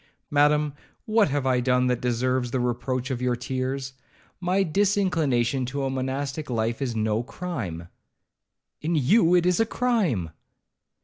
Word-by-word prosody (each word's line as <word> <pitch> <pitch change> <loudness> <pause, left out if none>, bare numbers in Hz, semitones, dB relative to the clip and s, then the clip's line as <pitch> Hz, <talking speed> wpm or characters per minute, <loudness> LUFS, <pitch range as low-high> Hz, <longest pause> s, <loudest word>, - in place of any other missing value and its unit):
'Madam, 150 0 +3 0.3
what 215 -4 +3
have 140 -1 -1
I 130 -1 +2
done 125 0 +2
that 125 -1 0
deserves 125 +1 0
the 130 - -1
reproach 125 +2 -2
of 125 -1 -3
your 125 -1 +1
tears? 130 +2 -3 0.5
My 185 +2 +1
disinclination 165 - +1
to 140 +2 -3
a 135 - -1
monastic 135 +3 -3
life 115 +1 -1
is 125 -4 -2
no 110 0 0
crime?' 115 - -5 0.9
'In 165 +2 0
you 165 - +4
it 175 -1 +3
is 180 +2 +2
a 225 - +4
crime.' 195 - 0
135 Hz, 145 wpm, -25 LUFS, 125-165 Hz, 0.9 s, you